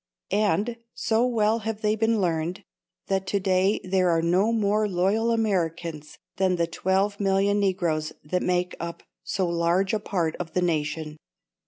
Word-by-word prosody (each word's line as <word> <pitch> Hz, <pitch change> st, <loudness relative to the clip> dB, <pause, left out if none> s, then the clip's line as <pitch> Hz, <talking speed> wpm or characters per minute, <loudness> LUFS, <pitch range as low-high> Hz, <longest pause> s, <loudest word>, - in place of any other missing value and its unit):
And 210 Hz, +3 st, +1 dB, 0.2 s
so 230 Hz, +2 st, +1 dB
well 225 Hz, -2 st, +2 dB
have 220 Hz, 0 st, -4 dB
they 210 Hz, -1 st, +2 dB
been 225 Hz, 0 st, +1 dB
learned, 170 Hz, 0 st, -1 dB, 0.4 s
that 190 Hz, -1 st, -1 dB
to 200 Hz, -, +1 dB
day 190 Hz, +2 st, +2 dB
there 185 Hz, -1 st, +2 dB
are 165 Hz, -1 st, +2 dB
no 185 Hz, +6 st, +3 dB
more 215 Hz, -1 st, +1 dB
loyal 200 Hz, +5 st, +1 dB
Americans 170 Hz, -8 st, -1 dB, 0.2 s
than 185 Hz, -1 st, +2 dB
the 170 Hz, -1 st, +1 dB
twelve 190 Hz, +4 st, 0 dB
million 200 Hz, +1 st, +2 dB
Negroes 175 Hz, -6 st, 0 dB
that 180 Hz, +5 st, -1 dB
make 180 Hz, 0 st, 0 dB
up 170 Hz, 0 st, -6 dB, 0.2 s
so 190 Hz, -2 st, -1 dB
large 170 Hz, +3 st, +1 dB
a 215 Hz, -, +1 dB
part 175 Hz, -6 st, -1 dB
of 165 Hz, -3 st, -6 dB
the 180 Hz, -, +1 dB
nation. 155 Hz, -2 st, -2 dB
190 Hz, 160 wpm, -25 LUFS, 170-210 Hz, 0.4 s, no